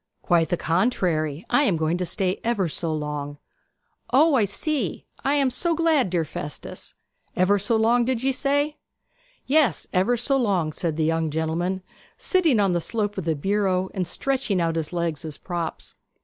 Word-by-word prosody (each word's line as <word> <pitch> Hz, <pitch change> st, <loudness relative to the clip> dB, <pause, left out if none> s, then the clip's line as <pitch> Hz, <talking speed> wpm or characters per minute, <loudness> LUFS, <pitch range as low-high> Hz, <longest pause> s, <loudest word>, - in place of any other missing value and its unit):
'Quite 165 Hz, -2 st, +2 dB
the 175 Hz, -, +1 dB
contrary. 165 Hz, -, 0 dB
I -, -, +3 dB
am 190 Hz, -10 st, +2 dB
going 160 Hz, +1 st, 0 dB
to 180 Hz, -, -2 dB
stay 185 Hz, +1 st, -1 dB
ever 225 Hz, -6 st, +1 dB
so 165 Hz, +1 st, -2 dB
long!' 150 Hz, -1 st, -4 dB, 0.7 s
'O 300 Hz, +5 st, +5 dB
I 235 Hz, -6 st, +4 dB
see! 225 Hz, -, -2 dB, 0.2 s
I 280 Hz, +2 st, +2 dB
am 275 Hz, -3 st, +2 dB
so 340 Hz, +5 st, 0 dB
glad, 315 Hz, -, +2 dB
dear 170 Hz, -2 st, 0 dB
Festus. 145 Hz, -1 st, -7 dB, 0.4 s
Ever 200 Hz, +3 st, +3 dB
so 205 Hz, +4 st, +1 dB
long, 230 Hz, +2 st, +3 dB
did 255 Hz, -1 st, -1 dB
ye 270 Hz, -, +3 dB
say?' 285 Hz, +3 st, 0 dB, 0.7 s
'Yes, 295 Hz, -2 st, +2 dB
ever 195 Hz, +6 st, +2 dB
so 270 Hz, +4 st, +1 dB
long,' 190 Hz, -, +1 dB
said 160 Hz, -1 st, -2 dB
the 160 Hz, -, +1 dB
young 165 Hz, 0 st, +1 dB
gentleman, 165 Hz, +4 st, -1 dB, 0.3 s
sitting 330 Hz, -, +2 dB
on 200 Hz, -2 st, +3 dB
the 175 Hz, -1 st, 0 dB
slope 210 Hz, +1 st, -2 dB
of 180 Hz, -, -6 dB
the 160 Hz, -2 st, +1 dB
bureau 190 Hz, +2 st, 0 dB
and 185 Hz, -3 st, -2 dB
stretching 255 Hz, -1 st, -1 dB
out 165 Hz, -1 st, 0 dB
his 160 Hz, -2 st, -2 dB
legs 170 Hz, -3 st, -2 dB
as 155 Hz, -3 st, -6 dB
props. 170 Hz, -3 st, -5 dB
185 Hz, 175 wpm, -24 LUFS, 165-245 Hz, 0.7 s, O